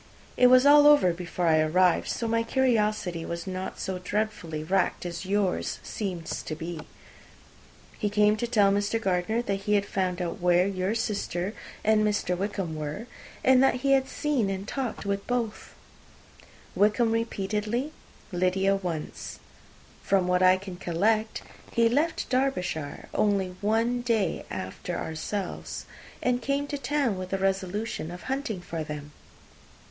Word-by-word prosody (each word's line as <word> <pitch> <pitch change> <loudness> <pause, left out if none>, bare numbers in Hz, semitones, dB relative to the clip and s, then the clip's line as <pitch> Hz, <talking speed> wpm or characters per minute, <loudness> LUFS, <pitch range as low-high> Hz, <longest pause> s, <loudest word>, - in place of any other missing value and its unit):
It 250 - +6
was 255 +1 +6
all 290 0 +8
over 290 -12 +6
before 175 0 -3
I 160 -1 +4
arrived; 175 +3 +3
so 230 - -2
my 230 0 +2
curiosity 215 -8 +1
was 170 0 -5
not 185 0 -5
so 190 -1 -3
dreadfully 180 -5 -2
racked 185 +2 0
as 175 +2 -5
yours 195 -2 0
seems 180 -6 -4
to 155 - -5
have - - -17
been. 165 -1 -6 1.1
He 210 - 0
came 210 +1 +4
to 240 - -2
tell 210 -4 +4
Mr. 205 +3 +1
Gardiner 195 +3 0
that 195 -4 -1
he 210 - +4
had 200 0 +2
found 185 -2 -1
out 180 +3 -3
where 175 0 +4
your 190 +2 -1
sister 200 -3 -2 0.3
and 215 0 +4
Mr. 205 -4 +1
Wickham 190 -3 -3
were, 155 +8 -5 0.4
and 260 0 +6
that 260 -2 +3
he 275 - +4
had 270 -1 +4
seen 275 -10 0
and 195 +1 -4
talked 255 -5 -3
with 200 0 0
them 245 - +2
both 215 - -13 1.0
Wickham 215 +3 +3
repeatedly, 225 +4 -1 0.4
Lydia 190 +2 +2
once. 175 -5 -5 0.6
From 190 -2 +2
what 180 0 +2
I 185 0 +6
can 185 -2 -8
collect, 215 +6 0 0.3
he 230 0 +4
left 295 +8 0
Derbyshire 180 - -1
only 195 -3 +1
one 225 +4 +1
day 225 -8 0
after 95 - -5
ourselves, 170 +5 -4 0.4
and 250 0 +1
came 280 +3 0
to 290 - -2
town 275 -9 0
with 185 0 -5
the 195 - -1
resolution 195 -1 -2
of 175 0 -8
hunting 260 -8 -3
for 165 -2 -4
them. 150 -1 -7
200 Hz, 155 wpm, -27 LUFS, 180-230 Hz, 1.1 s, all